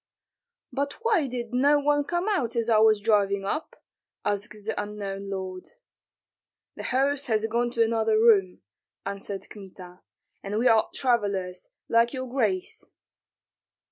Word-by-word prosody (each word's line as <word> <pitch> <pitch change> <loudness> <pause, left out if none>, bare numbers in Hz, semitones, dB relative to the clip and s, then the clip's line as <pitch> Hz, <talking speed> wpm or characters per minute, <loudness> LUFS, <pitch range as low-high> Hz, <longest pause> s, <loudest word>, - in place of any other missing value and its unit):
"But 280 +1 -1
why 420 -11 +2
did 240 -2 -5
no 285 +4 +4
one 290 0 +1
come 350 +5 -1
out 265 - 0
as 235 0 0
I 220 -2 +5
was 215 -1 +5
driving 200 -2 +2
up?" 305 +11 -4 0.4
asked 205 +1 -2
the 220 - -1
unknown 200 -1 -5
lord. 185 -1 -5 1.1
"The - - -7
host 280 +2 +1
has 220 -2 +1
gone 235 +2 0
to 235 -1 +2
another 225 -1 +1
room," 205 - +4 0.4
answered 200 0 -5
Kmita, 185 -3 -12 0.4
"and 200 +2 -3
we 240 +3 +3
are 225 -2 +4
travellers, 200 -7 -1 0.2
like 230 +2 +3
your 260 -1 -4
grace." 215 -8 -1
220 Hz, 140 wpm, -26 LUFS, 200-255 Hz, 1.1 s, I